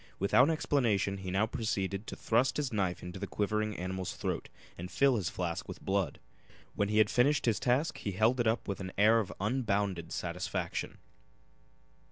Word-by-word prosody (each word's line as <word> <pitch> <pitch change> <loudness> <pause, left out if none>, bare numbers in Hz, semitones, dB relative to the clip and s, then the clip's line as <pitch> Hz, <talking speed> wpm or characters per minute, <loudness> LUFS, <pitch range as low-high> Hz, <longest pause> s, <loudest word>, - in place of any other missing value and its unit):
Without 125 - +4
explanation 115 -11 +1
he 95 -1 -5
now 95 +4 +2
proceeded 105 -3 -2
to - - -5
thrust 125 +3 +1
his 145 -5 -1
knife 95 -4 -1
into 90 0 -7
the - - -4
quivering 105 0 -1
animal's 95 +1 -4
throat - - -3 0.3
and 90 +1 -7
fill 135 +8 +3
this 95 -6 -1
flask 85 -2 -3
with - - -7
blood. 95 -2 -1 0.5
When 100 0 0
he 105 - +1
had 110 -1 +5
finished 140 +5 +3
his 115 -3 +2
task 130 +6 +1
he 100 - -3
held 110 +6 +2
it 120 - +2
up 115 +2 0
with 100 - -3
an 95 -1 -6
air 110 +3 +6
of 105 - -3
unbounded 100 -6 -1
satisfaction. - - -3
105 Hz, 180 wpm, -31 LUFS, 95-120 Hz, 0.5 s, air